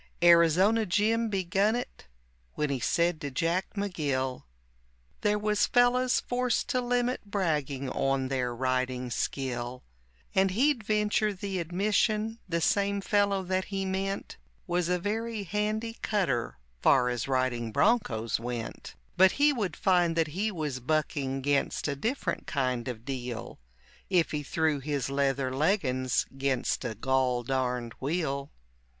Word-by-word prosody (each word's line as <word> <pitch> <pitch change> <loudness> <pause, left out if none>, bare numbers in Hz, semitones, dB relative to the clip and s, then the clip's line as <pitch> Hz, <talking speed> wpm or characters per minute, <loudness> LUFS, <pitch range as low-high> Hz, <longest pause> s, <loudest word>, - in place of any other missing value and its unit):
Arizona 175 +6 +5
Jim 220 +4 +1
begun 195 +2 +1
it 245 - -6 0.5
when 150 -2 -1
he 135 - -1
said 170 +4 +1
to 145 - -3
Jack 165 +9 -1
McGill 145 - -2 0.8
There 210 0 +2
was 210 0 +1
fellows 250 +1 +3
forced 250 -1 -1
to 255 - +1
limit 245 +1 0
bragging 150 -9 -1
on 135 0 0
their 130 -2 -1
riding 130 0 -1
skill, 125 -1 -3 0.5
And 190 0 +3
he'd 250 +5 +2
venture 210 0 +1
the 190 0 -3
admission 210 +5 0
the 170 -1 0
same 200 +3 +2
fellow 200 -1 +1
that 185 +1 -1
he 195 -1 -3
meant 195 +1 -3 0.3
Was 175 -1 0
a 180 - +2
very 220 +3 -3
handy 215 +4 -2
cutter 140 - 0 0.2
far 125 -2 +4
as 120 0 -2
riding 130 -3 0
bronchos 115 - +1
went; 120 -1 -6 0.2
But 190 0 +6
he 290 +1 +4
would 205 - -2
find 175 -3 +2
that 165 -2 +1
he 200 +8 -1
was 150 -8 -3
bucking 135 -1 -1
'gainst 145 +2 0
a 145 - -1
different 230 - -2
kind 130 -4 -1
of 120 -2 -6
deal 125 -4 -5 0.5
If 180 -4 +2
he 150 - -2
threw 155 0 0
his 140 -1 -2
leather 140 -1 0
leggins 135 - +1
'gainst 135 -2 -1
a 115 -2 -3
gol 130 +1 +1
darned 125 -2 -1
wheel. 140 -2 -2
165 Hz, 140 wpm, -29 LUFS, 130-205 Hz, 0.8 s, But